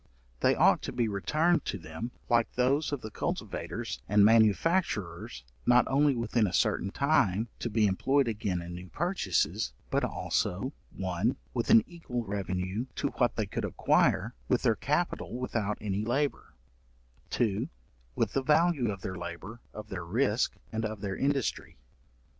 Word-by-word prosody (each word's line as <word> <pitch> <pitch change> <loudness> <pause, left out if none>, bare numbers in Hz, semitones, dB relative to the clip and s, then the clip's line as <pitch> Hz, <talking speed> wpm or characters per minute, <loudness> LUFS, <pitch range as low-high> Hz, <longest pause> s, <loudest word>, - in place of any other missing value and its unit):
They - - +3
ought - - +4
to - - -4
be 120 - 0
returned 155 - +1
to - - -2
them, 80 +7 -6 0.2
like 115 -1 +2
those 135 +5 +1
of 145 -3 -2
the 110 - -7
cultivators 65 - -4
and 105 0 +6
manufacturers, 105 - +2 0.2
not 125 0 +5
only 140 0 +3
within 115 -2 +1
a 90 - -5
certain 95 - +1
time, 110 -5 +2
to 120 - -2
be 110 -1 +2
employed 135 +8 +2
again 100 -5 -2
in 85 0 -7
new 90 +1 -8
purchases, 100 - 0 0.2
but - - +1
also, 125 +11 -1 0.2
1. 95 +5 0 0.2
with 120 - -1
an 225 0 +8
equal 145 -9 -5
revenue 95 +3 -2
to - - -1
what - - +3
they - - 0
could - - -4
acquire - - +2
with - - +1
their - - +4
capital - - -1
without 110 -5 -2
any 105 0 -2
labour; 135 - -1 0.7
2. 110 -5 0 0.5
with - - 0
the 135 - +1
value 150 -3 +3
of 100 -2 -4
their 95 - -4
labour, 90 +6 -7
of 105 -1 -9
their 90 -3 -4
risk, 110 +6 +1 0.2
and 110 0 -2
of 110 -2 -4
their 100 -2 -3
industry. 140 -2 -1
110 Hz, 160 wpm, -30 LUFS, 95-135 Hz, 0.7 s, an